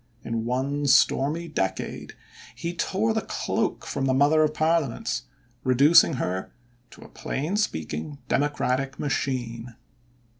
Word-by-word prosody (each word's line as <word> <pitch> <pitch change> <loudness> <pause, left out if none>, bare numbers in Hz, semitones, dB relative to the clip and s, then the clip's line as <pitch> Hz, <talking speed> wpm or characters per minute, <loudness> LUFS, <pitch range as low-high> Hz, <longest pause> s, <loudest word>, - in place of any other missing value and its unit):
In 115 0 -3
one 140 +4 -1
stormy 150 +5 +3
decade 95 - -3 0.4
he 170 +1 -4
tore 200 +6 0
the 220 - 0
cloak - - -2
from 135 - -2
the 130 -1 +2
Mother 145 +3 +4
of 155 0 +1
Parliaments, 155 - 0 0.4
reducing 145 +6 +6
her 95 -7 -3 0.4
to - - -16
a - - -12
plain 155 +8 -3
speaking 80 - -2
democratic 135 -2 0
machine. 120 -4 -3
140 Hz, 120 wpm, -25 LUFS, 125-155 Hz, 0.4 s, reducing